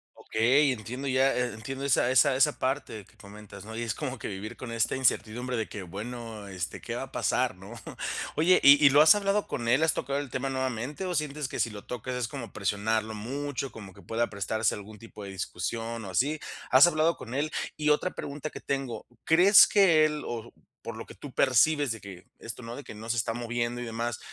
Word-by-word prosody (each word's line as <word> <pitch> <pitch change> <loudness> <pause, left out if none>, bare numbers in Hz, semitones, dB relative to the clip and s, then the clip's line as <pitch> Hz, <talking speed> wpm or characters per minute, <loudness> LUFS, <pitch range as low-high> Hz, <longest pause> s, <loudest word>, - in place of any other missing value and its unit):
Okey, 130 +6 +2
entiendo 125 +4 -5
ya, 135 +1 +3
e 125 -2 -1
entiendo 135 +6 -6
esa 125 -2 +3
esa 130 +1 +5
esa 140 +3 +2
parte 130 -6 -2
que - - -24
comentas, 100 0 -12
¿no? 110 +1 -8
y 115 - -3
es 115 -2 -2
como 135 -3 -4
que - - -6
vivir 105 +4 -6
con 125 -3 -7
esta 115 -1 0
incertidumbre 125 -1 0
de 110 - -3
que, 100 - -7
bueno, 110 +3 -7
este, 95 -4 -5
¿qué - - -5
va - - -3
a - - -10
pasar, - - 0
no? 95 +4 -11 0.6
Oye, 180 +4 +5
¿y 140 +1 +8
y 145 - +9
lo 145 +2 +6
has 155 +5 +8
hablado 205 0 0
con 120 - -4
él? 125 +6 +4
¿has 160 - +3
tocado 140 +2 -2
el 145 -2 -5
tema 130 +2 -2
nuevamente? 130 +5 -3
o 180 -1 -2
sientes 150 -2 -2
que - - -6
si 115 0 +1
lo 105 -2 -10
tocas 125 +1 -5
es 125 -2 -2
como 120 -1 -7
presionarlo 110 +2 -1
mucho, 135 +5 -4
como 100 -4 -11
que 100 - -16
pueda 115 +3 -1
prestarse 110 +2 -1
algún 105 +1 -10
tipo 110 -1 -11
de 100 - -7
discusión 115 +4 -4
o - - -7
así, 130 - +1
¿h - - -10 0.4
as 145 +6 +9
hablado 165 0 +2
con 115 - -9
él? 145 +3 -1 0.3
Y 150 0 +1
otra 150 +5 +2
pregunta 145 +2 -6
que - - -9
tengo, 135 -4 -3 0.2
¿crees 185 +5 +7
que 170 -7 +5
él, 150 -1 -2
o 115 -1 -6 0.3
por 115 - -7
lo 110 - -7
que - - -13
tú 140 -3 -10
percibes 140 +1 +3
de 115 - -4
que 95 -3 -11
esto 115 +2 -8
no, 115 +1 -7
de 145 - -8
que - - -9
no 110 +2 -9
se 120 - 0
está 115 0 0
moviendo 120 +1 -2
y - - -4
demás, 115 +1 -3
120 Hz, 230 wpm, -28 LUFS, 110-140 Hz, 0.6 s, y